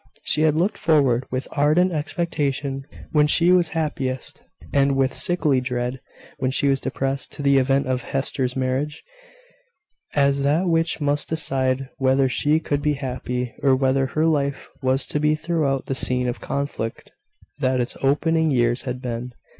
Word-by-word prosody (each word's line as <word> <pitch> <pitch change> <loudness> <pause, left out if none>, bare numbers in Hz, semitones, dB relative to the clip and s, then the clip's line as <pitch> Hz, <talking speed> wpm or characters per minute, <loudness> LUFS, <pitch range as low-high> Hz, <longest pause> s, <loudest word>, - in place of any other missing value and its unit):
She 150 - +1
had 155 -1 +3
looked 190 +6 0
forward, 135 -6 +2
with 130 +1 -3
ardent 155 +5 +3
expectation 145 -4 -2 0.2
when 150 -1 +4
she 170 +4 +4
was 175 -3 +3
happiest, 135 -5 -3 0.3
and 140 -1 +3
with 135 -1 +1
sickly 150 -7 +2
dread 125 0 -3 0.4
when 130 -2 0
she 135 +2 0
was 135 -1 +1
depressed, 135 0 -2
to 145 - -6
the 140 -1 +4
event 135 +1 +2
of 130 -1 -1
Hester's 130 0 -2
marriage, 130 +3 -2 1.1
as 140 -1 +3
that 150 +6 +2
which 165 -1 +1
must 145 0 0
decide 135 -4 0
whether 135 0 +3
she 150 +4 +2
could 145 -2 -2
be 150 0 +1
happy, 125 -2 -4
or 135 -2 +4
whether 135 0 +1
her 155 +4 0
life 140 -3 0
was 130 +1 +1
to 150 - -2
be 150 +1 +2
throughout 155 -4 -1
the - - -2
scene 125 -1 +1
of 120 - -3
conflict 140 -5 -4 0.5
that 130 -1 +1
its 120 0 -2
opening 160 +4 +2
years 120 -2 +2
had 125 0 -5
been. 125 0 -4
140 Hz, 160 wpm, -22 LUFS, 130-150 Hz, 1.1 s, when